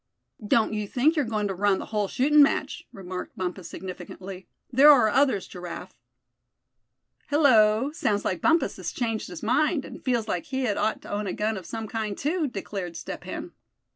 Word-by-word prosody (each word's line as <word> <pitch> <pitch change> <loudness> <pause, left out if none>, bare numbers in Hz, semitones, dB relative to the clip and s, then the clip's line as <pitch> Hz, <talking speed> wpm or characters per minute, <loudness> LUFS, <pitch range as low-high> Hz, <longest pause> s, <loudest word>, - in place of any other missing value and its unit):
"Don't 220 +1 +2
you 210 -1 -2
think 280 +10 +2
you're 295 -4 +1
goin' 215 -2 -1
to 195 - -2
run 195 +1 +2
the - - -6
whole 210 -2 -1
shootin' 295 +8 +4
match," 280 - +1
remarked 185 +2 -7
Bumpus 185 -1 -4
significantly. 185 0 -8 0.3
"There 275 +4 +8
are 245 -7 +5
others, 260 -5 +2
Giraffe." 180 -1 -8 1.3
"Hello! 255 -4 +4
sounds 210 -10 -1
like 180 -3 -1
Bumpus 330 +1 +2
has - - -4
changed 225 -3 -2
his 175 -2 -9
mind, 295 +6 +1
and - - -10
feels 240 -4 0
like 175 -5 -2
he 265 0 -2
had 215 -5 0
ought 215 +1 -1
to - - -9
own 205 0 -2
a 185 - -2
gun 215 +1 -1
of 185 -4 -8
some 225 +1 -5
kind 215 -2 -3
too!" 315 +2 0
declared 195 -6 -5
Step - - -7
Hen. - - -6
215 Hz, 185 wpm, -26 LUFS, 195-265 Hz, 1.3 s, There